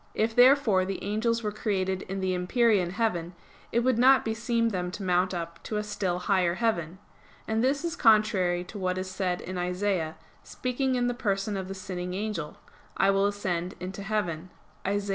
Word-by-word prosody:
If 225 +1 0
therefore 245 -6 +5
the 190 +1 -4
angels 230 +3 0
were 210 - -1
created 190 -3 -1
in 195 0 -3
the 185 -1 0
empyrean 185 +1 +2
heaven, 180 -4 -1 0.4
it 235 - +2
would 250 -1 +2
not 265 +2 +6
beseem 230 +1 0
them 180 -4 -2
to 200 - -6
mount 180 0 +2
up 170 -2 -5
to 215 - -2
a 210 - -1
still 205 -4 -2
higher 180 -2 +1
heaven. 185 -7 -1 0.5
And 220 +1 0
this 280 +5 +1
is 340 0 -2
contrary 210 - +3
to 200 +3 -9
what 185 -1 -1
is 185 0 -4
said 185 -2 -1
in 185 0 -5
Isaias, 180 -2 -1 0.3
speaking 255 +1 -2
in 245 -1 +1
the 245 - +1
person 205 -3 -1
of 190 -1 -4
the 195 - -6
sinning 180 -1 -5
angel: 195 -7 -4 0.4
"I 195 - +4
will 195 +1 +3
ascend 185 -3 -2
into 185 +2 -6
heaven" 185 -5 -2 0.4
(Isa. 205 0 -1
195 Hz, 185 wpm, -28 LUFS, 180-225 Hz, 0.5 s, not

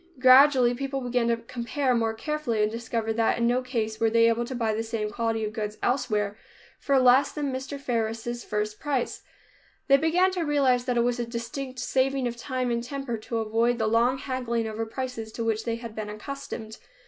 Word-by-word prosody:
Gradually 255 -1 +6
people 275 +2 -3
began 245 -1 0
to 235 0 +2
compare 245 +3 -2
more 225 -2 0
carefully 240 -4 -1
and 210 - +1
discovered 230 -1 -2
that 225 -1 +2
in 235 - +1
no 245 +2 +2
case 225 -4 -3
were 225 - +3
they 230 +1 +4
able 230 +1 +1
to 255 - -5
buy 225 -3 0
the 220 - -1
same 225 -2 -3
quality 225 0 -1
of 210 - -5
goods 215 -1 -4
elsewhere 210 -6 0 0.4
for 275 -1 +2
less 255 +1 +5
than 285 -3 -3
Mr. 270 +2 -5
Faris' 235 -1 -2
first 210 0 -3
price. 275 -4 -2 0.7
They 275 -1 +7
began 345 +5 +3
to 370 -1 -2
realize 275 -5 +2
that 250 -2 0
it 235 - +4
was 245 0 0
a 240 - -1
distinct 255 +3 -5
saving 265 +1 0
of 240 - -4
time 255 0 -2
and 235 0 -1
temper 270 -1 -4
to 230 +2 -4
avoid 225 +2 +1
the 220 - 0
long 235 +4 +3
haggling 245 -4 -2
over 220 +1 -4
prices 230 -2 -5
to 230 - -3
which 225 -1 -1
they 230 -1 -1
had 230 -1 -8
been 215 -1 -5
accustomed. 220 -1 -7
235 Hz, 205 wpm, -26 LUFS, 225-260 Hz, 0.7 s, They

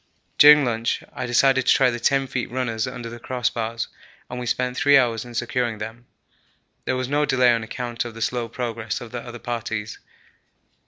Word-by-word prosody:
During 150 -1 +9
lunch 115 -1 -1
I 125 - -4
decided 130 +1 +3
to - - +6
try 135 -2 +4
the 120 - -4
10 135 +3 +2
feet 125 -2 -3
runners 120 -2 -2
under 125 -2 -6
the 120 +1 -8
crossbars 115 -2 -2 0.4
and 125 - -4
we 125 - -5
spent 125 +1 -1
three 145 +1 +5
hours 115 -4 +1
in 120 -1 -11
securing 120 -3 -1
them. 110 +3 -8 0.8
There 130 - 0
was 130 -1 -2
no 145 +2 +1
delay 130 -4 +4
on 115 - 0
account 120 +1 -4
of 120 -2 -8
the 115 - -9
slow 120 -2 -2
progress 115 -2 -4
of 120 -2 -10
the 120 -1 -5
other 120 0 -9
parties. 110 -3 -4
120 Hz, 195 wpm, -23 LUFS, 115-125 Hz, 0.8 s, During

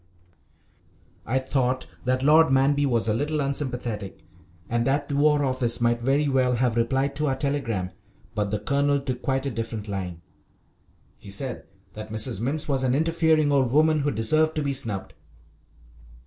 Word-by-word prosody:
I 130 +5 +1
thought 130 -1 0 0.2
that 130 +1 0
Lord 155 +2 +5
Manby 140 +2 +3
was 115 -3 +1
a 110 - +2
little 150 +6 -1
unsympathetic, 125 - -3 0.4
and 120 0 0
that 140 +1 +1
the 140 - -3
War 145 0 +3
Office 130 -3 +1
might 120 0 +1
very 140 +4 +2
well 130 -2 +2
have 120 -1 +1
replied 135 +4 0
to 150 0 0
our 135 - +1
telegram, 125 -10 -2 0.4
but 105 -1 -1
the 105 - -1
Colonel 140 +6 +1
took 130 -2 -4
quite 135 0 -1
a 140 - -1
different 115 -2 -5
line. 90 -4 -5 0.9
He - - -13
said 100 - -5 0.3
that 110 0 -8
Mrs. 110 -2 -2
Mimms 145 +5 -2
was 135 -3 0
an 130 -1 +1
interfering 160 -1 +2
old 135 -4 +2
woman 155 +2 +4
who 145 0 0
deserved 155 +7 +1
to 155 - -1
be 140 -1 -1
snubbed. 105 -7 -3
130 Hz, 165 wpm, -25 LUFS, 115-145 Hz, 0.9 s, Lord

